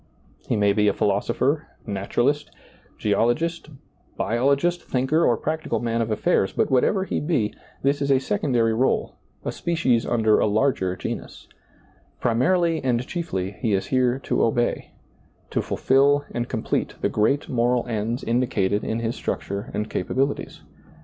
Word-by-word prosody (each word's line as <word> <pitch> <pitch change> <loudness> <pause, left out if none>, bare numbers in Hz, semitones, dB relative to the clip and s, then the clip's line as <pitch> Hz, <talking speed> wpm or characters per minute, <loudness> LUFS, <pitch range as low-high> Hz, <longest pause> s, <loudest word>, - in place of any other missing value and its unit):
He - - +1
may 100 -1 +3
be 105 0 +3
philosopher, 110 +9 0 0.2
naturalist, 120 +8 0 0.5
geologist, 120 +11 0 0.5
biologist, 140 +9 +1
thinker, 135 +6 +1
or 120 - +3
practical 155 -6 -2
man 115 0 -1
of 115 - -1
affairs, 105 -2 +1
but - - 0
whatever 190 +9 +3
he - - -2
be, 140 -10 0 0.3
this 140 +1 +1
is 140 - 0
a 135 - +5
sec 200 +10 -2
ondary 120 -5 +2
r61e, 130 +4 +1 0.3
a - - -1
species 160 -9 0
under 110 -2 +3
a - - +3
larger 105 -4 +1
genus. - - -6 0.7
Primarily 165 +8 +2
and 125 -1 +1
chiefly 115 - -3
he 115 -5 +1
is 95 - 0
here 130 -1 +3
to - - +1
obey, 120 +1 +2
to - - -7
^lailizccbvGoOgle - - -11
S8 - - -22
SEEING - - -34 0.2
DARKLY - - -4
fulfill 140 +2 +3
and 120 0 -3
complete 110 -3 -2
the - - +2
great 110 +7 +1
moral 120 0 +1
ends 115 +1 -2
indicated 110 -4 0
in 110 +1 -2
his 115 +1 -2
structure 100 +1 -4
and 105 0 -2
capabilities. 135 +10 -2
120 Hz, 155 wpm, -24 LUFS, 110-140 Hz, 0.7 s, a